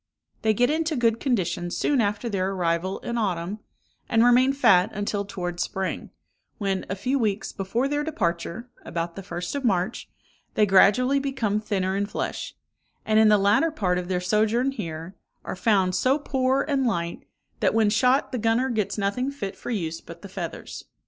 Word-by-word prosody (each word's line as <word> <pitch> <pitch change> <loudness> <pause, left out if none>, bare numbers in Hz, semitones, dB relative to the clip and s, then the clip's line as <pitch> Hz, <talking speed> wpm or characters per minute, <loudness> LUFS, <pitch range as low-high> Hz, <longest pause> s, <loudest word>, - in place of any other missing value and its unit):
They 220 -1 +2
get 245 +5 +3
into 315 0 0
good 230 -3 +2
condition 180 - -1
soon 270 +8 +1
after 205 +2 -1
their 190 -4 -1
arrival 180 +1 -1
in 235 0 -3
autumn, 190 -1 -2 0.5
and 225 0 +4
remain 250 +2 +5
fat 195 -10 +4
until 205 0 -2
toward 175 -3 -5
spring, 190 +2 -3 0.5
when, 195 -2 -2
a 190 - -1
few 260 +8 -1
weeks 215 -3 -1
before 225 +7 -1
their 290 +1 -1
departure 190 - -2 0.2
(about 170 0 -4
the 195 - -6
first 175 -2 -5
of 280 -1 -3
March), 205 0 0 0.5
they 210 - +4
gradually 230 +8 +5
become 265 -7 -1
thinner 195 -3 -1
in 200 +1 0
flesh; - - -4 0.5
and 215 0 +3
in 220 -1 +6
the 210 - +6
latter 205 +11 +3
part 185 - 0
of 180 - -5
their 180 -1 0
sojourn 220 +7 +1
here, 165 -6 -6 0.3
are - - -4
found 190 -1 +2
so 255 +9 +2
poor 265 -2 +1
and 275 -4 0
light, 170 -6 -3 0.3
that - - +2
when 220 -2 +3
shot 250 +5 +3
the 250 - -2
gunner 225 +4 +2
gets 215 -3 -1
nothing 210 +6 0
fit 205 -9 -5
for - - -8
use 165 -8 -3
but - - -12
the - - -8
feathers. - - -6
210 Hz, 180 wpm, -25 LUFS, 185-250 Hz, 0.5 s, in